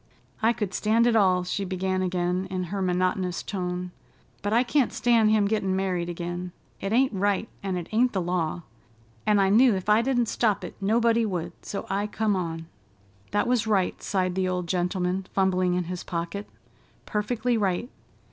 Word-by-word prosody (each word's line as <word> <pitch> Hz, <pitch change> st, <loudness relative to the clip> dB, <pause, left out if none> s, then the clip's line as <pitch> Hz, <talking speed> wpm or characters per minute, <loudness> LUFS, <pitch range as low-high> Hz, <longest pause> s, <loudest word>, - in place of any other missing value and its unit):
"I 225 Hz, +1 st, +4 dB
could 210 Hz, -5 st, -3 dB
stand 220 Hz, +4 st, +2 dB
it 240 Hz, -1 st, +3 dB
all," 185 Hz, -4 st, +4 dB
she 190 Hz, +2 st, -2 dB
began 185 Hz, 0 st, -1 dB
again 180 Hz, 0 st, -1 dB
in 185 Hz, -1 st, -2 dB
her 200 Hz, -, -1 dB
monotonous 185 Hz, 0 st, 0 dB
tone, 180 Hz, -2 st, -3 dB, 0.5 s
"but 205 Hz, -, -2 dB
I 235 Hz, +3 st, +4 dB
can't 260 Hz, +1 st, +1 dB
stand 230 Hz, -3 st, +3 dB
him 215 Hz, -1 st, +4 dB
gettin' 200 Hz, -2 st, 0 dB
married 180 Hz, -2 st, -1 dB
again. 175 Hz, +1 st, -5 dB, 0.3 s
It 195 Hz, -, -3 dB
ain't 260 Hz, +2 st, +3 dB
right, 205 Hz, +2 st, 0 dB
and 190 Hz, -2 st, -2 dB
it 175 Hz, -, -5 dB
ain't 240 Hz, +3 st, +3 dB
the 195 Hz, -, -1 dB
law, 175 Hz, -1 st, -1 dB, 0.6 s
an' 210 Hz, -1 st, +4 dB
I 195 Hz, -1 st, +3 dB
knew 230 Hz, +2 st, +5 dB
ef 190 Hz, +2 st, -4 dB
I 210 Hz, +2 st, +5 dB
didn't 245 Hz, -1 st, +1 dB
stop 215 Hz, -2 st, 0 dB
it, -, -, -6 dB
nobody 230 Hz, +3 st, +3 dB
would, 175 Hz, -5 st, -2 dB
so 200 Hz, -, -5 dB
I 200 Hz, +2 st, -1 dB
come 210 Hz, -1 st, 0 dB
on." 165 Hz, -3 st, -3 dB, 0.6 s
"That 205 Hz, -, +1 dB
was 240 Hz, -3 st, +1 dB
right," 195 Hz, -4 st, +1 dB
sighed 185 Hz, -2 st, 0 dB
the 185 Hz, 0 st, 0 dB
old 180 Hz, -1 st, -2 dB
gentleman, 180 Hz, +1 st, -1 dB
fumbling 185 Hz, -2 st, +2 dB
in 180 Hz, -, 0 dB
his 180 Hz, +1 st, -5 dB
pocket, 170 Hz, +4 st, -4 dB, 0.6 s
"perfectly 230 Hz, +3 st, -1 dB
right. 200 Hz, 0 st, 0 dB
190 Hz, 180 wpm, -26 LUFS, 180-215 Hz, 0.6 s, knew